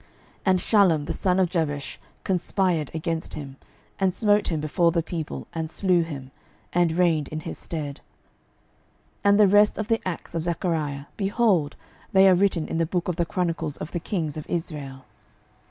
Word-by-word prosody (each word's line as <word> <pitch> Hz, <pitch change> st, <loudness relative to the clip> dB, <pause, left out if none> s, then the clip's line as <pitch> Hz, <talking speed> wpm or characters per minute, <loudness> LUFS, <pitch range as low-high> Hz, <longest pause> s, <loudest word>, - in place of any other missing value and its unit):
12:015:010 -, -, -30 dB, 0.4 s
And 185 Hz, -1 st, +4 dB
Shallum 180 Hz, -8 st, +3 dB
the -, -, -2 dB
son 185 Hz, -1 st, +1 dB
of 185 Hz, -, +4 dB
Jabesh 145 Hz, -5 st, -2 dB, 0.2 s
conspired 180 Hz, -4 st, 0 dB
against 160 Hz, +1 st, -3 dB
him, 140 Hz, -3 st, -8 dB, 0.4 s
and 190 Hz, -1 st, +3 dB
smote 205 Hz, +1 st, +2 dB
him 160 Hz, -3 st, -1 dB
before 170 Hz, +3 st, +2 dB
the 165 Hz, -1 st, 0 dB
people, 160 Hz, -2 st, -5 dB
and 160 Hz, -1 st, -3 dB
slew 180 Hz, 0 st, +2 dB
him, 140 Hz, -5 st, -6 dB, 0.4 s
and 175 Hz, -2 st, +3 dB
reigned 165 Hz, -4 st, +2 dB
in 155 Hz, 0 st, -5 dB
his -, -, -7 dB
stead. 150 Hz, -4 st, -5 dB, 1.2 s
12:015:011 -, -, -38 dB
And 200 Hz, +1 st, +5 dB
the 210 Hz, -, +7 dB
rest 205 Hz, +2 st, +5 dB
of 215 Hz, +1 st, -3 dB
the 225 Hz, 0 st, +2 dB
acts 175 Hz, -1 st, -5 dB
of 165 Hz, -1 st, -2 dB
Zachariah, 160 Hz, -5 st, -2 dB
behold, 195 Hz, -7 st, +1 dB, 0.4 s
they 190 Hz, 0 st, +7 dB
are 190 Hz, -, +7 dB
written 180 Hz, -3 st, +2 dB
in -, -, -3 dB
the 165 Hz, -, +1 dB
book 180 Hz, +1 st, -1 dB
of 175 Hz, -, -2 dB
the 170 Hz, -2 st, 0 dB
chronicles 165 Hz, -4 st, -2 dB
of 155 Hz, -, -6 dB
the 175 Hz, -, -2 dB
kings 160 Hz, -4 st, -3 dB
of 155 Hz, -, -7 dB
Israel. 145 Hz, -6 st, -4 dB
170 Hz, 185 wpm, -25 LUFS, 155-190 Hz, 1.2 s, the